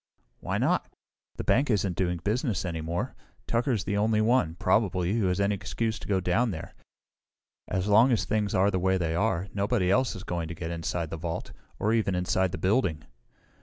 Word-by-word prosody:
"Why -, -, -2 dB
not? -, -, +1 dB, 0.4 s
The -, -, -4 dB
bank 135 Hz, +3 st, +2 dB
isn't 100 Hz, -5 st, +1 dB
doing 90 Hz, -1 st, 0 dB
business 110 Hz, -, 0 dB
any 85 Hz, -2 st, -3 dB
more. 85 Hz, +2 st, -3 dB, 0.3 s
Tucker 120 Hz, +3 st, 0 dB
is 110 Hz, -6 st, 0 dB
the 100 Hz, 0 st, -1 dB
only 110 Hz, +1 st, +2 dB
one, 110 Hz, -7 st, +2 dB
probably, 95 Hz, -1 st, +1 dB
who 100 Hz, -, +2 dB
has 90 Hz, +1 st, 0 dB
any 100 Hz, +1 st, +2 dB
excuse 110 Hz, +3 st, -2 dB
to -, -, -9 dB
go 95 Hz, -2 st, +2 dB
down 95 Hz, +7 st, +1 dB
there. 80 Hz, -5 st, -6 dB, 0.9 s
As 95 Hz, 0 st, -1 dB
long 110 Hz, +5 st, +6 dB
as 115 Hz, -, +1 dB
things 105 Hz, -2 st, 0 dB
are 100 Hz, +2 st, +3 dB
the 95 Hz, -, 0 dB
way 95 Hz, +1 st, +2 dB
they 85 Hz, -3 st, -1 dB
are, 95 Hz, 0 st, 0 dB
nobody 100 Hz, -2 st, +1 dB
else 130 Hz, +2 st, +2 dB
is 95 Hz, -, -7 dB
going 85 Hz, -5 st, -3 dB
to 85 Hz, -, -6 dB
get 80 Hz, 0 st, -5 dB
inside 85 Hz, -1 st, -3 dB
the 80 Hz, -, -3 dB
vault 80 Hz, 0 st, -4 dB, 0.3 s
or 110 Hz, +2 st, +1 dB
even 110 Hz, -5 st, +1 dB
inside 90 Hz, +1 st, +1 dB
the -, -, -4 dB
building." 95 Hz, -, +1 dB
95 Hz, 205 wpm, -28 LUFS, 90-110 Hz, 0.9 s, long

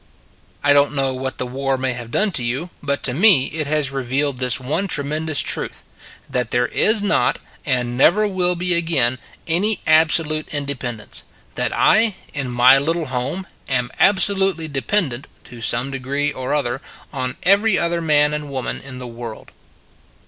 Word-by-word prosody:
I 145 Hz, 0 st, +4 dB
don 145 Hz, 0 st, +4 dB
t -, -, -10 dB
know 135 Hz, -1 st, +1 dB
what 130 Hz, +1 st, -5 dB
the 125 Hz, -, -2 dB
war 135 Hz, +2 st, -2 dB
may 130 Hz, -1 st, -1 dB
have 120 Hz, -1 st, -7 dB
done 210 Hz, -, +1 dB
to 125 Hz, -, +4 dB
you, 135 Hz, +9 st, -3 dB
but 140 Hz, -1 st, -2 dB
to 125 Hz, -, +2 dB
me 170 Hz, -, +5 dB
it 155 Hz, -2 st, -3 dB
has 150 Hz, -2 st, -1 dB
revealed 135 Hz, +1 st, -2 dB
this 125 Hz, 0 st, +2 dB
one 155 Hz, +10 st, -2 dB
tremendous 155 Hz, -1 st, +1 dB
truth: -, -, -2 dB, 0.4 s
that 125 Hz, -3 st, -2 dB
there 125 Hz, +1 st, +1 dB
is 215 Hz, -, +4 dB
not, 205 Hz, 0 st, +1 dB, 0.3 s
and 125 Hz, -3 st, -1 dB
never 210 Hz, +9 st, +4 dB
will 180 Hz, -2 st, 0 dB
be 180 Hz, +1 st, 0 dB
again, 145 Hz, -8 st, +2 dB, 0.3 s
any 200 Hz, +6 st, +1 dB
absolute 155 Hz, -1 st, +2 dB
in 145 Hz, -1 st, -3 dB
dependence; 120 Hz, -6 st, -5 dB, 0.3 s
that -, -, -1 dB
I, 220 Hz, -2 st, +3 dB, 0.2 s
in 140 Hz, -3 st, -4 dB
my 125 Hz, +2 st, +5 dB
little 165 Hz, +3 st, -1 dB
home, 140 Hz, +10 st, -3 dB, 0.2 s
am 125 Hz, -2 st, -1 dB
absolutely 190 Hz, -3 st, +2 dB
dependent, 140 Hz, -2 st, -1 dB, 0.2 s
to 120 Hz, -1 st, -13 dB
some 120 Hz, +4 st, +2 dB
degree 140 Hz, +2 st, -2 dB
or 130 Hz, 0 st, -5 dB
other, 135 Hz, -2 st, -2 dB, 0.3 s
on 130 Hz, -2 st, -4 dB
every 200 Hz, +2 st, +3 dB
other 170 Hz, 0 st, -1 dB
man 150 Hz, -2 st, +3 dB
and 150 Hz, -1 st, -4 dB
woman 130 Hz, -2 st, -4 dB
in 130 Hz, -1 st, -10 dB
the 125 Hz, -, -7 dB
world. 115 Hz, -2 st, -9 dB
140 Hz, 170 wpm, -19 LUFS, 130-170 Hz, 0.4 s, me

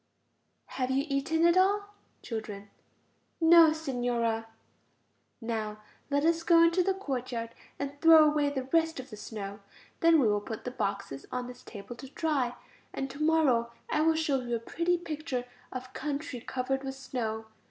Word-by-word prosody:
Have 255 Hz, -1 st, -3 dB
you 270 Hz, +2 st, +1 dB
eaten 315 Hz, +4 st, +1 dB
it 340 Hz, 0 st, +5 dB
all? 405 Hz, +2 st, +3 dB, 0.3 s
Children. 210 Hz, -3 st, -6 dB, 0.7 s
No, 330 Hz, -1 st, +8 dB
Signora. 245 Hz, -7 st, -1 dB, 0.9 s
Now 215 Hz, -2 st, -4 dB, 0.3 s
let 285 Hz, +1 st, +1 dB
us 330 Hz, 0 st, +3 dB
go 335 Hz, 0 st, +6 dB
into 335 Hz, +2 st, +4 dB
the 380 Hz, +1 st, +1 dB
courtyard 250 Hz, -9 st, -4 dB, 0.3 s
and 280 Hz, 0 st, -5 dB
throw 325 Hz, -2 st, +8 dB
away 295 Hz, -1 st, +2 dB
the 270 Hz, -2 st, -3 dB
rest 325 Hz, +3 st, +1 dB
of 260 Hz, 0 st, -9 dB
the -, -, -6 dB
snow. 205 Hz, -1 st, -7 dB, 0.4 s
Then 330 Hz, -1 st, +5 dB
we 250 Hz, -, +4 dB
will 205 Hz, -1 st, +2 dB
put 220 Hz, +1 st, -7 dB
the 250 Hz, -, -4 dB
boxes 200 Hz, -, -4 dB
on 250 Hz, -1 st, -2 dB
this 250 Hz, 0 st, -10 dB
table 215 Hz, +2 st, -9 dB
to 270 Hz, -, -10 dB
dry. 275 Hz, -5 st, -1 dB, 0.4 s
And 270 Hz, 0 st, -4 dB
to 280 Hz, +3 st, -9 dB
morrow 290 Hz, -7 st, +3 dB, 0.2 s
I 305 Hz, -, +2 dB
will 320 Hz, +1 st, +4 dB
show 295 Hz, -4 st, +1 dB
you 240 Hz, -1 st, -2 dB
a -, -, -2 dB
pretty 340 Hz, +9 st, 0 dB
picture 310 Hz, -6 st, -4 dB, 0.3 s
of 255 Hz, 0 st, -7 dB
country 285 Hz, -2 st, -4 dB
covered 265 Hz, +2 st, -2 dB
with 270 Hz, 0 st, -4 dB
snow. 230 Hz, -4 st, -4 dB
270 Hz, 165 wpm, -29 LUFS, 235-320 Hz, 0.9 s, No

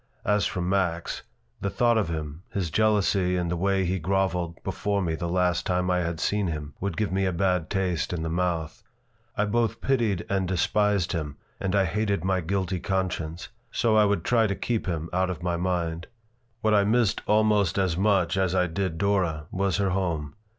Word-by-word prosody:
As 105 Hz, 0 st, +2 dB
for 90 Hz, -, -3 dB
Max, 90 Hz, -2 st, -1 dB, 0.4 s
the 100 Hz, -, -1 dB
thought 120 Hz, +3 st, +2 dB
of 105 Hz, -7 st, +1 dB
him, 80 Hz, -1 st, -5 dB
his 90 Hz, -5 st, -2 dB
jealousy 100 Hz, -3 st, +2 dB
and 85 Hz, -1 st, -1 dB
the -, -, 0 dB
way 95 Hz, +2 st, +1 dB
he 95 Hz, +2 st, 0 dB
groveled 90 Hz, -1 st, 0 dB
before 100 Hz, -1 st, -1 dB
me 85 Hz, -4 st, -1 dB
the 85 Hz, +1 st, -3 dB
last 90 Hz, -1 st, +1 dB
time 90 Hz, 0 st, 0 dB
I 90 Hz, -, +2 dB
had 85 Hz, -2 st, -2 dB
seen 105 Hz, -2 st, 0 dB
him, 75 Hz, -3 st, -4 dB
would 100 Hz, -3 st, -3 dB
give 105 Hz, -3 st, 0 dB
me 95 Hz, 0 st, +1 dB
a -, -, +1 dB
bad 90 Hz, -1 st, 0 dB
taste 95 Hz, -5 st, -1 dB
in 85 Hz, -2 st, -2 dB
the -, -, -2 dB
mouth. 85 Hz, -1 st, -2 dB, 0.6 s
I 105 Hz, -, +2 dB
both 115 Hz, +1 st, 0 dB
pitied 115 Hz, -9 st, 0 dB
and 95 Hz, -2 st, 0 dB
despised 100 Hz, +1 st, +1 dB
him, 75 Hz, -4 st, -3 dB, 0.2 s
and 95 Hz, 0 st, -1 dB
I 100 Hz, -1 st, +4 dB
hated 100 Hz, 0 st, -1 dB
my 95 Hz, -1 st, +1 dB
guilty 95 Hz, +1 st, -1 dB
conscience; 90 Hz, -3 st, -2 dB, 0.2 s
so 115 Hz, -2 st, +2 dB
I 105 Hz, -1 st, +6 dB
would 100 Hz, 0 st, +1 dB
try 115 Hz, -2 st, +3 dB
to 100 Hz, -, -1 dB
keep 115 Hz, -2 st, -2 dB
him 85 Hz, -2 st, -2 dB
out 95 Hz, +1 st, +1 dB
of 90 Hz, -2 st, -5 dB
my 90 Hz, -1 st, 0 dB
mind. 85 Hz, -1 st, -2 dB, 0.5 s
What 110 Hz, 0 st, +2 dB
I 100 Hz, -1 st, +5 dB
missed 110 Hz, +1 st, +2 dB
almost 105 Hz, -4 st, +3 dB
as 95 Hz, -4 st, +1 dB
much 95 Hz, -1 st, +2 dB
as 95 Hz, -1 st, +1 dB
I 90 Hz, -1 st, +3 dB
did 90 Hz, 0 st, -2 dB
Dora 90 Hz, -6 st, 0 dB
was 95 Hz, 0 st, 0 dB
her 100 Hz, -2 st, +1 dB
home. 85 Hz, -6 st, -1 dB
95 Hz, 200 wpm, -26 LUFS, 85-100 Hz, 0.6 s, I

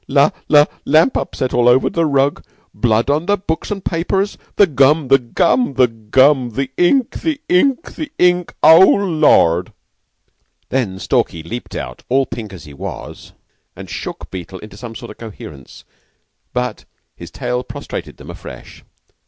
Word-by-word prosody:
La 140 Hz, +2 st, +3 dB, 0.2 s
la 150 Hz, -1 st, +6 dB, 0.2 s
lamp 155 Hz, -, +3 dB
upset 130 Hz, -, -3 dB
all 120 Hz, 0 st, +4 dB
over 125 Hz, +2 st, +4 dB
the 165 Hz, -1 st, 0 dB
rug. 140 Hz, 0 st, +1 dB, 0.3 s
Blood 115 Hz, -1 st, +1 dB
on 155 Hz, +4 st, -1 dB
the 205 Hz, 0 st, +2 dB
books 160 Hz, -4 st, -4 dB
and 195 Hz, -2 st, -5 dB
papers. 190 Hz, +4 st, -1 dB, 0.2 s
The 205 Hz, -, +6 dB
gum! 140 Hz, -1 st, +2 dB
The 135 Hz, 0 st, +6 dB
gum! 135 Hz, -, 0 dB
The 130 Hz, -1 st, +4 dB
gum! 125 Hz, +4 st, +2 dB
The 135 Hz, +3 st, -3 dB
ink! 235 Hz, +8 st, +1 dB
The 315 Hz, -3 st, -2 dB
ink! 260 Hz, -, +1 dB
The 305 Hz, -2 st, -6 dB
ink! 180 Hz, -1 st, +2 dB
Oh, 160 Hz, +1 st, +9 dB
Lord!" 155 Hz, -, +3 dB, 1.0 s
Then 115 Hz, -8 st, -1 dB
Stalky 85 Hz, -3 st, -1 dB
leaped 120 Hz, +9 st, -7 dB
out, -, -, -6 dB
all 135 Hz, +2 st, +2 dB
pink 115 Hz, -4 st, -7 dB
as 90 Hz, -6 st, -11 dB
he 75 Hz, -, -12 dB
was, 70 Hz, -, -8 dB, 0.4 s
and -, -, -10 dB
shook -, -, -7 dB
Beetle 95 Hz, 0 st, -7 dB
into 105 Hz, +1 st, -12 dB
some 115 Hz, +2 st, -9 dB
sort -, -, -9 dB
of -, -, -15 dB
coherence; 80 Hz, -, -11 dB, 0.7 s
but 125 Hz, -2 st, -3 dB, 0.3 s
his -, -, -10 dB
tale 125 Hz, 0 st, -3 dB
prostrated -, -, -7 dB
them -, -, -10 dB
afresh. -, -, -12 dB
135 Hz, 160 wpm, -17 LUFS, 115-170 Hz, 1.0 s, Oh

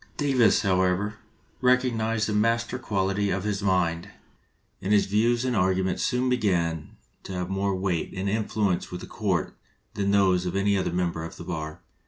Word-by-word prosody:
Davis, 130 Hz, -7 st, +3 dB
however, 95 Hz, +2 st, +1 dB, 0.4 s
recognized 115 Hz, -4 st, +2 dB
the 105 Hz, -, -1 dB
masterly 115 Hz, +2 st, +1 dB
quality 100 Hz, 0 st, 0 dB
of 95 Hz, 0 st, -1 dB
his 105 Hz, -1 st, -2 dB
mind, 90 Hz, -4 st, 0 dB, 0.7 s
and 95 Hz, -, -2 dB
his 105 Hz, -1 st, +4 dB
views 115 Hz, +4 st, +1 dB
and 125 Hz, -2 st, 0 dB
arguments 95 Hz, -1 st, +1 dB
soon 125 Hz, 0 st, +1 dB
began 85 Hz, -10 st, 0 dB, 0.2 s
to -, -, -9 dB
have 90 Hz, 0 st, -3 dB
more 95 Hz, 0 st, 0 dB
weight 95 Hz, -3 st, -1 dB
and 95 Hz, +1 st, -2 dB
influence 105 Hz, -3 st, 0 dB
with 90 Hz, -, -6 dB
the -, -, -7 dB
court -, -, -2 dB, 0.4 s
than 100 Hz, -1 st, -1 dB
those 95 Hz, -3 st, +3 dB
of 90 Hz, -, -3 dB
any 100 Hz, +1 st, +2 dB
other 95 Hz, -3 st, 0 dB
member 85 Hz, -2 st, -1 dB
of 80 Hz, -, -7 dB
the -, -, -9 dB
bar. 80 Hz, -3 st, -5 dB
100 Hz, 170 wpm, -26 LUFS, 90-110 Hz, 0.7 s, his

